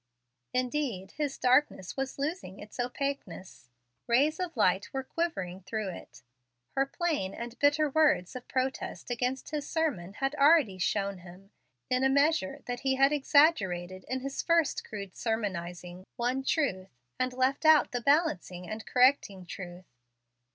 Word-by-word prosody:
Indeed 250 -7 -2
his 295 -3 -3
darkness 255 -7 +2
was 270 0 -3
losing 280 - -4
its 210 +4 -12
opaqueness. 245 - -4 0.4
Rays 280 +7 +3
of 355 -6 -4
light 190 -2 +2
were 265 0 -3
quivering 195 - -3
through 200 +2 -3
it. 175 - -11 0.5
Her 270 0 +1
plain 295 - -2
and 235 +1 -7
bitter 290 +1 +4
words 290 - +2
of 250 - -8
protest 260 -1 -3
against 250 +3 -2
his 295 -2 -3
sermon 275 - -1
had 270 +5 -1
already 285 - +4
shown 195 +1 -1
him, 185 +3 -14 0.4
in 255 +1 +1
a 265 - +4
measure, 280 -6 +1
that 245 0 -4
he 265 0 +1
had 275 +2 +4
exaggerated, 195 - +2
in 260 0 -2
his 275 +1 -3
first 335 -3 +2
crude 200 -3 -8
sermonizing, 180 -5 -4
one 250 +3 0
truth, 225 - 0 0.3
and 255 0 +1
left 260 +3 +1
out 315 -1 +6
the 245 - -2
balancing 220 - +1
and 215 +1 -6
correcting 250 -7 +3
truth. 180 0 -8
255 Hz, 145 wpm, -29 LUFS, 190-285 Hz, 0.5 s, out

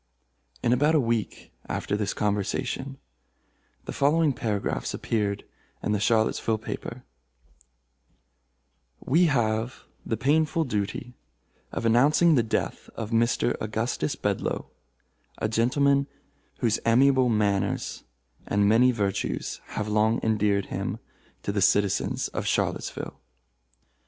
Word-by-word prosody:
In 120 - +3
about 150 +5 +3
a - - +5
week 115 -4 -2 0.2
after - - -2
this 105 -1 -1
conversation, 125 +6 -2 0.9
the - - -5
following 150 +1 +3
paragraphs 105 - -2
appeared 105 -3 -1 0.4
in 105 - 0
a 105 - +1
Charlottesville 110 +1 +2
paper: 110 - -6 2.0
"We 165 +7 +3
have 115 -4 0 0.2
the 110 - -2
painful 155 +4 +2
duty 115 -1 -3 0.6
of - - -3
announcing 145 +9 +5
the 130 - +4
death 110 - -2
of 110 0 -5
Mr. 115 +1 +2
Augustus 110 -6 -1
Bedlo, - - -2 0.7
a - - -1
gentleman 140 +5 +2 0.5
whose 115 -2 +2
amiable 130 +2 +4
manners 105 -3 0 0.4
and 100 0 +2
many 120 +4 +5
virtues 100 -4 -2
have 105 - -4
long 110 +2 +2
endeared 105 -3 +2
him - - -2 0.5
to - - -1
the 100 -1 -1
citizens 100 0 +2
of - - -4
Charlottesville. 70 - -2
115 Hz, 110 wpm, -26 LUFS, 105-130 Hz, 2.0 s, a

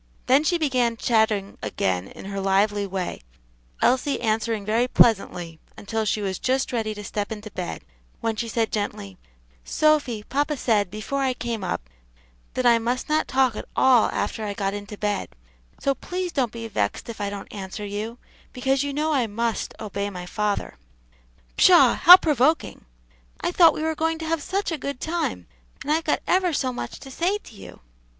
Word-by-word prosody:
Then 265 +4 +4
she 345 +3 +2
began 250 -7 +1
chatting 220 -4 +1
again 95 -3 -1
in - - -11
her 195 0 -4
lively 200 +1 +1
way, 190 -2 -4 0.6
Elsie 260 +3 +2
answering 220 -2 -1
very 230 +4 +2
pleasantly 180 -9 +2 0.2
until 220 +1 -3
she 210 +1 0
was 190 -1 -2
just 265 +1 0
ready 220 -2 -1
to 210 - -7
step 205 0 -4
into 215 -1 -7
bed, 180 -2 -5 0.4
when 225 -1 -1
she 230 +1 -3
said 225 0 -1
gently, 100 - -4 0.4
"Sophy, 285 - +1
papa 290 +5 -1
said, 210 -6 +1
before 215 +8 -3
I 260 -2 +1
came 230 -5 -4
up, - - -3 0.7
that 255 - -1
I 235 -1 +6
must 245 +4 -2
not 310 +1 +1
talk 260 -4 +2
at - - -6
all 255 -4 +5
after 220 - -2
I 205 -1 -3
got 195 -1 -1
into 205 0 -7
bed, 205 -1 -2 0.4
so 275 - +1
please 360 +5 -4
don't 255 -7 0
be 230 -1 -6
vexed - - -2
if 230 -3 -7
I 200 - -1
don't 200 -1 -8
answer 200 +1 -6
you, 210 +3 -5 0.4
because 265 +1 +1
you 285 0 -2
know 305 +2 0
I 255 -5 +2
must 230 +2 -2
obey 200 -1 -3
my 180 -2 -7
father." 205 - -2 0.8
"Pshaw! - - +7
how 360 +2 +10
provoking. 305 -1 +1 0.6
I - - 0
thought 335 -3 +6
we 310 - -3
were 320 0 0
going 320 +1 -1
to 320 - -6
have 325 -1 -1
such 390 +4 -2
a 320 - -3
good 280 -1 -4
time, 315 - -2 0.4
and 295 - -2
I've 320 +1 +1
got - - 0
ever 365 -2 +2
so 260 -3 0
much 120 - -6
to 270 - -10
say 360 +9 0
to 415 - -16
you." - - -12
230 Hz, 185 wpm, -24 LUFS, 205-280 Hz, 0.8 s, how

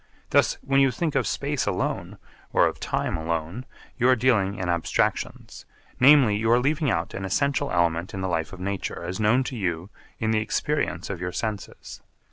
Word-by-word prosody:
Thus - - +3
when 135 0 +2
you 135 -1 +5
think 150 +5 -2
of - - +1
space 145 -1 -2
alone, - - -2 0.3
or - - +4
of - - -2
time - - -2
alone, 85 - -4 0.3
you 125 +1 +4
are 130 - +6
dealing 110 -6 +2
in 90 -3 -4
abstractions, 85 -1 -2 0.3
namely, 130 -5 +6
you 110 +2 0
are 120 +1 +5
leaving 145 +3 +1
out 85 -6 -1
an 95 - -5
essential 140 +9 0
element 85 0 +1
in 95 - -4
the 95 - -1
life 80 -3 -2
of 95 - -10
nature 95 -1 -4
as 90 +3 -4
known 115 +5 +3
to 130 - -5
you 90 -3 -3 0.3
in 110 0 -1
the 110 - +2
experience 110 - -2
of 90 -3 -6
your 90 0 -3
senses. 110 +1 -5
105 Hz, 190 wpm, -25 LUFS, 90-130 Hz, 0.3 s, are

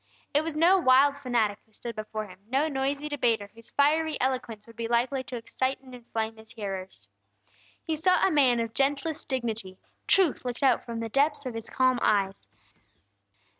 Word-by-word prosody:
It 295 +2 +3
was 320 -1 -4
no 355 +4 +5
wild 275 -1 +5
fanatic 240 -7 0
who 220 - -34
stood 235 +2 -6
before 215 0 -4
him, 185 -2 -14
no 270 +6 +1
noisy 280 +1 -1
debater 230 -8 0
whose 230 0 -11
fiery 310 +2 +2
eloquence 250 -5 -2
would 230 - -15
be 230 0 -3
likely 250 +3 +1
to 250 - -6
excite 260 +3 -2
and 260 -1 -15
inflame 225 -2 -4
His 220 0 -13
hearers. 190 - -5 0.8
He 320 - -1
saw 365 +4 +3
a 385 - +3
man 260 -6 +4
of 230 -1 -2
gentlest 285 +4 -1
dignity; 225 -7 -3 0.3
truth 370 -7 +3
looked 245 +2 -4
out 260 -3 +4
from 230 -1 -5
the 225 - -4
depths 285 +3 +1
of 255 - -4
His 225 0 -6
calm 255 -1 +2
eyes. 195 - +1
250 Hz, 180 wpm, -27 LUFS, 225-285 Hz, 0.8 s, no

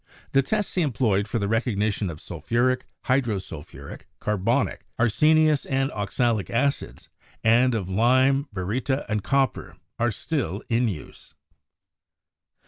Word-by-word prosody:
The 135 - +4
tests 210 +8 -1
he 180 - +1
employed 110 - +1
for 105 - -2
the 100 - -1
recog 110 +1 0
nition 105 -1 0
of 80 -2 -7
sulphuric, 120 +11 -1 0.2
hydrosulphuric, 110 - -3
carbonic, 105 +6 0
arsenious 150 +6 +3
and 135 0 0
oxalic 105 +1 -1
acids, 140 +4 -1 0.4
and 120 +2 +4
of 100 -5 -2
lime, 130 +8 +3
baryta 115 +8 -2
and 105 -2 -1
copper, 135 -1 0 0.2
are 120 +1 +2
still 115 - -3
in 120 +1 +2
use. 90 -8 -8
120 Hz, 125 wpm, -25 LUFS, 105-135 Hz, 0.4 s, The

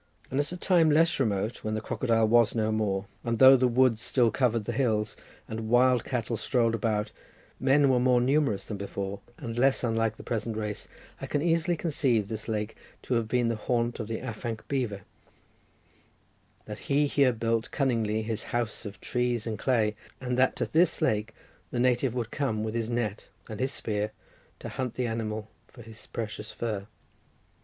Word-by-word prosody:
And 135 - 0
at 145 - -1
a 180 - -5
time 175 -3 +4
less 160 +2 +3
remote, 110 -1 -1
when 110 0 -2
the - - -1
crocodile 115 0 +1
was 115 0 +4
no 110 -1 +1
more, 100 -3 0 0.2
and 115 -1 -1
though 130 +2 +9
the 130 -1 +3
woods 125 -2 +3
still 120 -1 +2
covered 115 -3 +1
the 120 - -2
hills, 110 -4 0 0.3
and 110 0 -5
wild 125 0 +4
cattle 120 -2 -2
strolled 115 -2 +1
about, 110 -2 -1 0.5
men 140 +2 +4
were 130 -2 +3
more 125 0 +4
numerous 135 -4 +2
than 105 - -6
before, 100 0 -4 0.2
and 115 0 -5
less 135 +1 +3
unlike 115 -2 0
the - - -10
present 115 -2 -3
race, 105 -1 -4 0.3
I - - -4
can 145 - -1
easily 170 0 +2
conceive 135 - +1
this 110 -1 -5
lake 105 -1 -2 0.3
to - - -2
have 115 -2 +1
been 120 +1 +1
the 115 - 0
haunt 120 +2 -1
of 110 - -4
the 115 0 -3
afanc 115 -2 -5
beaver, 120 -8 -2 1.6
that 105 0 -7
he 145 +1 +4
here 140 -2 +3
built 115 -1 -1
cunningly 115 -5 0
his 110 0 -3
house 120 -2 -2
of 100 - -10
trees 120 -2 -1
and 110 -2 -3
clay, 110 -5 +1 0.2
and 125 -1 -2
that 130 +1 +3
to - - -1
this 165 +2 +2
lake 110 +1 0 0.3
the - - -4
native 125 0 +2
would 120 -2 -3
come 110 -7 -1
with 110 0 -3
his 115 -1 -2
net 115 -3 -2 0.2
and 110 -1 -7
his 130 +1 0
spear 105 -3 -2 0.4
to - - -7
hunt 130 -3 -4
the 125 - -1
animal 110 -2 -3 0.2
for 120 - -14
his 110 0 -10
precious 105 -1 -5
fur. 105 -4 -4
115 Hz, 185 wpm, -28 LUFS, 110-130 Hz, 1.6 s, though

